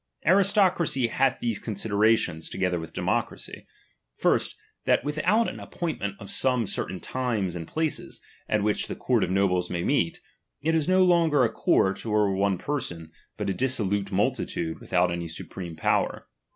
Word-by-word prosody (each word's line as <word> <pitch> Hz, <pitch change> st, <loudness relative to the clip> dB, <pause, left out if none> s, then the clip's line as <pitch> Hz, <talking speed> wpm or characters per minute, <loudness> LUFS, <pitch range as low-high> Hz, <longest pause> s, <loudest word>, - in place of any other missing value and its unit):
Aristocracy 185 Hz, -, +4 dB
hath 135 Hz, +2 st, +1 dB
these 115 Hz, -3 st, -1 dB
considerations, 105 Hz, -5 st, +1 dB
toge. 95 Hz, -1 st, -1 dB
ther 90 Hz, -, -1 dB
with 80 Hz, 0 st, -8 dB
democracy. -, -, -3 dB, 0.5 s
First, -, -, +2 dB, 0.3 s
that -, -, +3 dB
without 170 Hz, -, +1 dB
an -, -, -6 dB
ap -, -, -10 dB
pointment 155 Hz, -, -3 dB
of 100 Hz, -, -8 dB
some 125 Hz, -3 st, +1 dB
certain 95 Hz, -1 st, -3 dB
times 115 Hz, -9 st, -2 dB
and 80 Hz, -2 st, -6 dB
places, 160 Hz, -1 st, -3 dB, 0.3 s
at 105 Hz, -1 st, +1 dB
which 105 Hz, 0 st, 0 dB
the -, -, -5 dB
court -, -, +1 dB
of -, -, -1 dB
nobles 90 Hz, -2 st, +1 dB
may 85 Hz, -1 st, -2 dB
meet, -, -, +1 dB, 0.4 s
it 160 Hz, +3 st, 0 dB
is 160 Hz, -1 st, +1 dB
no 185 Hz, 0 st, +5 dB
longer 165 Hz, -6 st, +4 dB
a 115 Hz, -, +2 dB
court, 95 Hz, -3 st, +2 dB
or 105 Hz, -3 st, +2 dB
one 95 Hz, 0 st, +1 dB
person, 85 Hz, -, -4 dB, 0.3 s
but -, -, -3 dB
a 100 Hz, -, +1 dB
dissolute 100 Hz, -5 st, 0 dB
multitude 85 Hz, -4 st, -1 dB
with -, -, -15 dB
out 90 Hz, -1 st, +3 dB
any 85 Hz, 0 st, -3 dB
supreme 85 Hz, +1 st, -7 dB
power. 80 Hz, -, 0 dB
105 Hz, 165 wpm, -26 LUFS, 95-145 Hz, 0.5 s, no